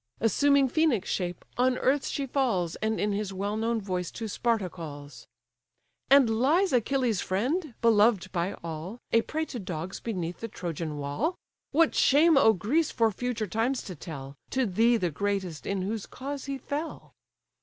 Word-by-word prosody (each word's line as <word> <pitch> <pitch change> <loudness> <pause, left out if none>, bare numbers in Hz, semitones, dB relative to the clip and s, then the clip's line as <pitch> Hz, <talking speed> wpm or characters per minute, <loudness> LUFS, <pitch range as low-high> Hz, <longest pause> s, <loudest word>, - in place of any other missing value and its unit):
Assuming 280 +5 +4
Phœnix' 260 - +2
shape 175 -2 -3
on 250 0 +3
earth 275 +2 +1
she 280 - -2
falls, 230 - 0
And 220 0 -1
in 210 - +1
his 200 -1 -2
well 200 +2 -2
known 225 +1 0
voice 185 -4 -3
to 225 - -4
Sparta 225 -2 0
calls: 145 -7 -9 0.8
"And 275 -2 +7
lies 280 - +2
Achilles' 245 -3 +1
friend, 255 - -1
beloved 210 -4 +4
by 180 +1 -1
all, 165 +6 -6
A 230 - +5
prey 315 +6 -3
to 250 - -6
dogs 180 -1 -5
beneath 180 -6 -4
the 230 - -4
Trojan 165 -6 -5
wall? 145 - -1 0.3
What 325 +2 +3
shame 315 +4 +5
'o 275 -5 +6
Greece 260 - +1
for 225 -2 +2
future 235 +1 -2
times 225 +6 -1
to 185 - -7
tell, 140 -3 -8
To 260 -1 +1
thee 230 +4 +3
the 180 -6 -1
greatest 190 -1 -2
in 195 -2 -1
whose 210 +2 -3
cause 275 +1 -6
he 275 -1 -3
fell!" 290 +5 -5
220 Hz, 165 wpm, -28 LUFS, 185-265 Hz, 0.8 s, And